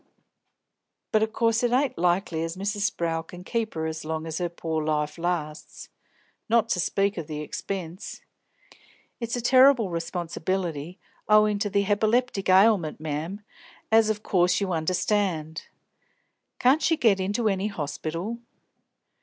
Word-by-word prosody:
But 215 Hz, -, +3 dB
of 220 Hz, 0 st, 0 dB
course 230 Hz, 0 st, +1 dB
it 245 Hz, -1 st, +1 dB
ain't 260 Hz, +1 st, +1 dB
likely 175 Hz, -1 st, 0 dB
as 165 Hz, +2 st, -4 dB
Mrs. 205 Hz, +2 st, 0 dB
Sprowl 165 Hz, -1 st, -2 dB
can 180 Hz, +2 st, -12 dB
keep 225 Hz, +1 st, -2 dB
her 160 Hz, 0 st, -2 dB
as 160 Hz, 0 st, -4 dB
long 160 Hz, 0 st, -3 dB
as 160 Hz, +1 st, -4 dB
her 175 Hz, -1 st, -1 dB
pore 160 Hz, -2 st, -3 dB
life 150 Hz, 0 st, -1 dB
lasts; 165 Hz, -3 st, -4 dB, 0.6 s
not 230 Hz, 0 st, +3 dB
to 180 Hz, -, 0 dB
speak 195 Hz, +2 st, 0 dB
of 155 Hz, -, -6 dB
the 150 Hz, -1 st, -5 dB
expense; 180 Hz, +3 st, -6 dB, 1.0 s
it's 235 Hz, -1 st, -3 dB
a 245 Hz, -, -2 dB
terrible 255 Hz, -4 st, +5 dB
responsibility, 170 Hz, -1 st, -3 dB, 0.3 s
owin' 210 Hz, -1 st, +5 dB
to 205 Hz, -, -1 dB
the 200 Hz, 0 st, +1 dB
hepiplectic 215 Hz, 0 st, +1 dB
ailment, 190 Hz, -5 st, +4 dB
mem, 155 Hz, +6 st, -4 dB, 0.5 s
as 220 Hz, -1 st, +5 dB
of 215 Hz, 0 st, -2 dB
course 180 Hz, -1 st, +2 dB
you 195 Hz, -3 st, -1 dB
understand." 165 Hz, -1 st, -1 dB, 0.9 s
"Can't 265 Hz, +5 st, +4 dB
she 325 Hz, -, +2 dB
get 210 Hz, -7 st, +3 dB
into 205 Hz, +4 st, 0 dB
any 195 Hz, 0 st, 0 dB
hospital!" 170 Hz, +4 st, -4 dB
190 Hz, 145 wpm, -26 LUFS, 165-215 Hz, 1.0 s, terrible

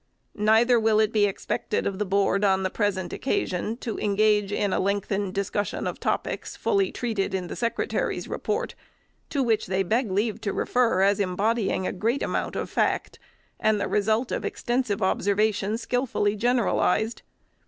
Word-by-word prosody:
Neither 225 Hz, +3 st, +4 dB
will 220 Hz, -1 st, +3 dB
it 215 Hz, 0 st, +3 dB
be 210 Hz, -2 st, +4 dB
expected 200 Hz, +1 st, -2 dB
of 195 Hz, -1 st, -2 dB
the 210 Hz, -, -1 dB
Board, 195 Hz, +1 st, +2 dB
on 190 Hz, -1 st, +3 dB
the 185 Hz, -, -1 dB
present 195 Hz, -4 st, -1 dB
occasion, 230 Hz, -, -1 dB
to 230 Hz, -, -4 dB
engage 210 Hz, 0 st, +2 dB
in 205 Hz, -1 st, 0 dB
a -, -, +1 dB
lengthened 200 Hz, 0 st, -1 dB
discussion 200 Hz, +1 st, -2 dB
of -, -, -3 dB
topics, -, -, -2 dB
fully 395 Hz, -3 st, +1 dB
treated 215 Hz, -6 st, -2 dB
in 185 Hz, -1 st, -2 dB
their -, -, -6 dB
Secretary's 235 Hz, 0 st, -1 dB
report, -, -, -2 dB, 0.6 s
to 280 Hz, -3 st, 0 dB
which 225 Hz, -3 st, +1 dB
they 190 Hz, +1 st, +1 dB
beg 225 Hz, +5 st, 0 dB
leave 205 Hz, +3 st, -1 dB
to 200 Hz, -, -2 dB
refer, 230 Hz, -6 st, +2 dB
as 200 Hz, +1 st, +3 dB
embodying 200 Hz, +1 st, 0 dB
a -, -, -2 dB
great 225 Hz, +8 st, 0 dB
amount -, -, -2 dB
of -, -, -2 dB
fact, -, -, -1 dB, 0.4 s
and 215 Hz, -1 st, +2 dB
the 200 Hz, -, -1 dB
result 220 Hz, +4 st, +1 dB
of -, -, -2 dB
extensive 240 Hz, -5 st, -1 dB
observation 205 Hz, +2 st, +1 dB
skilfully 235 Hz, -4 st, 0 dB
generalized. 225 Hz, -1 st, +1 dB
210 Hz, 165 wpm, -25 LUFS, 195-230 Hz, 0.6 s, Neither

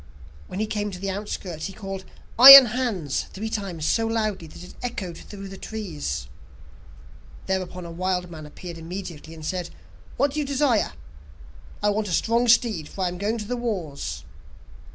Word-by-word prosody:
When 185 Hz, -, -6 dB
he 215 Hz, -, +1 dB
came 210 Hz, -1 st, -2 dB
to 185 Hz, -, -7 dB
the 195 Hz, +1 st, -3 dB
outskirts, 190 Hz, -4 st, -5 dB
he 195 Hz, -, -9 dB
called 195 Hz, -1 st, -7 dB, 0.3 s
'Iron 275 Hz, +1 st, +13 dB
Hans' 200 Hz, -, -1 dB
three 220 Hz, +3 st, -5 dB
times 185 Hz, -8 st, -4 dB
so 225 Hz, +5 st, +1 dB
loudly 215 Hz, -6 st, -2 dB
that 170 Hz, -, -12 dB
it 180 Hz, -, -12 dB
echoed 210 Hz, -8 st, -4 dB
through 195 Hz, +3 st, -10 dB
the 195 Hz, 0 st, -10 dB
trees. 200 Hz, -9 st, -5 dB, 1.2 s
Thereupon 185 Hz, -1 st, -3 dB
the 170 Hz, -, -8 dB
wild 180 Hz, 0 st, -2 dB
man 155 Hz, -2 st, -9 dB
appeared 170 Hz, +3 st, -9 dB
immediately, 165 Hz, -2 st, -8 dB
and 155 Hz, -1 st, -9 dB
said: 180 Hz, 0 st, -3 dB, 0.5 s
'What 280 Hz, 0 st, +2 dB
do 305 Hz, -, -2 dB
you 295 Hz, -, -1 dB
desire?' 270 Hz, -, +1 dB, 0.9 s
'I 210 Hz, -, +4 dB
want 210 Hz, +1 st, -1 dB
a 180 Hz, -, -3 dB
strong 235 Hz, +6 st, +2 dB
steed, 225 Hz, -9 st, +3 dB
for 190 Hz, -, -4 dB
I 180 Hz, -, +1 dB
am 175 Hz, 0 st, -7 dB
going 210 Hz, +4 st, -1 dB
to 210 Hz, -2 st, -6 dB
the 245 Hz, -, -2 dB
wars. 195 Hz, -, -4 dB
195 Hz, 175 wpm, -24 LUFS, 175-220 Hz, 1.2 s, Iron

